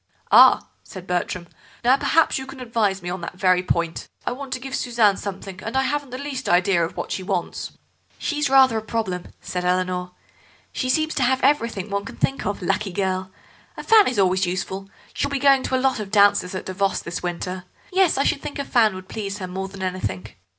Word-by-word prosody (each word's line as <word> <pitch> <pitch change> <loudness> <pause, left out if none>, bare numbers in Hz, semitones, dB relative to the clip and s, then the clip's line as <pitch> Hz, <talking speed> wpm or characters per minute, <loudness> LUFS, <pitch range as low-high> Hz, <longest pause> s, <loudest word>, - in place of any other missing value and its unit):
"Ah," - - +7 0.2
said 185 -2 -10
Bertram. 180 -1 -2 0.4
"Now, 250 +2 +6
perhaps 320 +1 +2
you 265 - -7
can 270 0 -10
advise 220 -6 -1
me 175 - -4
on 185 0 -5
that 170 - -6
very 185 -1 +3
point. 170 -2 -2 0.2
I - - 0
want 265 +1 -7
to 255 - -3
give 265 +1 -5
Suzanne 230 -5 +2
something, 195 -1 -7
and 225 +6 -3
I 265 - +3
haven't 290 0 -2
the 255 - -6
least 270 -2 -4
idea 175 -1 +3
what - - -6
she - - -2
wants." 185 -2 -3 0.4
"She's 295 -3 -1
rather 265 -4 +5
a - - -8
problem," 210 -5 -3
said 180 0 -4
Eleanor. 180 0 -1 0.6
"She 255 - -2
seems 310 +4 +1
to - - -1
have 260 +2 +1
everything 230 -8 +1
one 200 0 -1
can - - -8
think 270 - -1
of, 205 -2 -3
lucky 200 +3 0
girl. 185 0 -1 0.5
A - - -6
fan 440 -2 +6
is 250 - -1
always 190 -1 +2
useful; 190 +2 -4 0.2
she'll 280 - -1
be 280 - -1
going 275 -1 +5
to 260 - -1
a 260 +1 0
lot 260 -3 +2
of 210 -2 -5
dances 200 -2 +4
at 185 - -5
Davos 195 +1 -1
this 170 - -5
winter. 180 +1 -4 0.3
Yes, 375 -5 +3
I 275 - +3
should 285 -1 +1
think - - -6
a 280 - -3
fan 220 -7 +3
would 185 0 -9
please 205 -2 -4
her 190 - -5
more 190 +1 -4
than 190 0 -8
anything. 185 - -3
200 Hz, 215 wpm, -23 LUFS, 185-260 Hz, 0.6 s, Ah